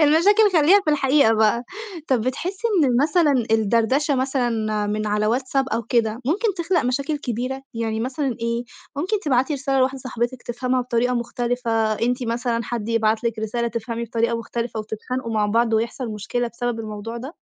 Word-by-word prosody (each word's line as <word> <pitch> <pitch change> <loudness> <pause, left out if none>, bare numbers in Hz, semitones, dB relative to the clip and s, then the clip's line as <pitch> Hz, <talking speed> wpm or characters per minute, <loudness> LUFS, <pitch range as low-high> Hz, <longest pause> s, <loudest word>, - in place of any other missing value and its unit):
المشاكل 385 +8 +5
خلّيها 365 +7 +6
في 305 - +2
الحقيقة 280 -4 +4
بقى. 220 +2 +3 0.5
طَب 260 -3 +3
بتحسّي 365 - -2 0.2
إن 250 -3 +2
مثلًا، 305 0 +3 0.2
الدردشة 230 +7 +2
مثلًا 235 -5 0
من 215 +1 -2
على 210 +1 +1
WhatsApp 270 +1 -1
أو 230 - -1
كده، 230 0 0
ممكن 405 - +1
تخلق 345 +1 +1
مشاكل 275 +4 0
كبيرة، 255 +1 -3
يعني 225 -1 -2
مثلًا 260 +4 -2
إيه، 235 +1 -1 0.3
ممكن 375 +8 0
تبعتي 270 -1 +1
رسالة 275 -1 0
لواحدة 260 +1 +1
صاحبِتك 245 0 -3
تِفهمها 255 +1 -1
بطريقة 245 0 0
مختلفة 240 0 -2 0.2
أنتِ 245 +4 0
مثلًا، 235 0 -1
حد 230 -1 -4
يبعت 225 0 +1
لِك 230 -1 -1
رسالة 235 +2 -1
تفهمي 230 +1 -4
بطريقة 230 +1 0
مختلفة 230 -1 -4
وتتخانقوا 230 +3 -4
مع 210 -1 +2
بعض 225 +2 +2
ويحصل 230 +3 -1
مشكلة 225 +3 -2
بسبب 235 0 -3
الموضوع 215 +1 -6
ده؟ 265 +8 -8
240 Hz, 165 wpm, -22 LUFS, 225-270 Hz, 0.5 s, خلّيها